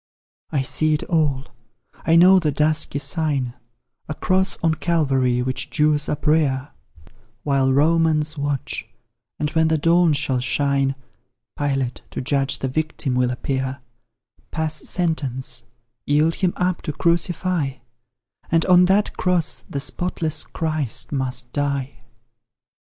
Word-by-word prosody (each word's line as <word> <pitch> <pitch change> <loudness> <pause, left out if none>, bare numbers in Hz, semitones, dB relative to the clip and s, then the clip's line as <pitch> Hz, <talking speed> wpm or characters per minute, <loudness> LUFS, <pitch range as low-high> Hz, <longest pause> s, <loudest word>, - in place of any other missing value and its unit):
I 140 -4 0
see 155 +3 +1
it 150 - -3
all 150 -5 0 0.6
I 165 - +5
know 185 +3 +7
the 155 -4 0
dusky 150 0 +1
sign 145 -5 -1 0.6
A 155 - -3
cross 185 +5 +1
on 165 -1 +3
Calvary, 135 -7 +1
which 130 0 -3
Jews 150 -1 +1
uprear 150 -2 +1 0.7
While 135 -2 +2
Romans 155 +1 +2
watch; 145 -2 -3 0.5
and 150 0 -2
when 160 -1 +2
the 160 0 +2
dawn 165 +1 +3
shall 130 -2 0
shine 135 +1 0 0.6
Pilate, 135 -3 -2
to - - -6
judge 135 +1 +1
the 135 - -3
victim, 155 -1 -2
will 125 0 +2
appear 130 +1 -3 0.7
Pass 160 -1 -3
sentence 130 -8 -1 0.4
yield 150 +3 +3
Him 185 -1 0
up 180 -1 -1
to 150 - -4
crucify; 170 -2 0 0.8
And 165 0 +3
on 180 -1 +6
that 200 +3 +2
cross 180 -3 0
the 140 - -3
spotless 160 +1 -2
Christ 155 -6 -2
must 125 -3 -2
die. 140 -2 -2
150 Hz, 125 wpm, -22 LUFS, 135-165 Hz, 0.8 s, know